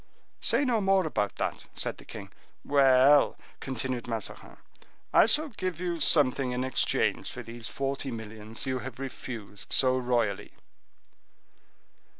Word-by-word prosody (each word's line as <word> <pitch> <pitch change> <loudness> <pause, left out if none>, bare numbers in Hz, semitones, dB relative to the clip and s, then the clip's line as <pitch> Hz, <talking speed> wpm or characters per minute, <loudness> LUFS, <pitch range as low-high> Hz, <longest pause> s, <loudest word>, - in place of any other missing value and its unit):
"Say 290 - +3
no 235 -4 +1
more 195 -2 +2
about 105 -10 -2
that," - - -4
said - - -3
the - - -14
king. - - -10 0.3
"Well!" 140 0 +5 0.2
continued 130 -2 -4
Mazarin, 115 -3 -5 0.6
"I - - +6
shall 300 +6 +3
give 185 - -4
you 175 -2 -3
something 135 -4 +3
in 125 +1 -2
exchange 130 -1 +1
for 125 - -7
these 115 0 -8
forty 135 0 -3
millions 110 -1 -5
you 130 -1 -2
have 125 -1 -8
refused 120 -6 -6
so 130 -1 +5
royally." 120 -5 -1
130 Hz, 135 wpm, -28 LUFS, 115-145 Hz, 0.6 s, I